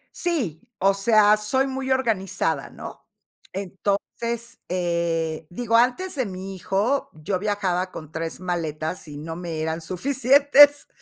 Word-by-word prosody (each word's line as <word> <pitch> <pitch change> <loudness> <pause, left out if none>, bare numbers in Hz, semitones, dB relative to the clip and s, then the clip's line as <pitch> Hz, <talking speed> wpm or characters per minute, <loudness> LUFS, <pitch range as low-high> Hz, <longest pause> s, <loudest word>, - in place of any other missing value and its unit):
Sí, 250 - -1 0.2
o 195 +1 +4
sea, 210 +1 +5
soy 260 +6 +1
muy 265 0 -4
organizada, 225 -8 0
¿no? - - -10 0.5
Entonces 205 +5 -3
eh, 170 -3 -1
digo, 230 +4 +1
antes 255 +11 +1
de 260 -3 0
mi 190 0 -6
hijo, 205 +9 0
yo 155 +5 -3
viajaba 190 -3 -1
con 155 -1 -9
3 165 +2 -5
maletas 165 -2 -3
y 145 -1 -8
no 160 +2 -6
me 170 -3 -4
eran 160 +1 -2
suficientes, 280 - +5
195 Hz, 130 wpm, -24 LUFS, 170-240 Hz, 0.5 s, sea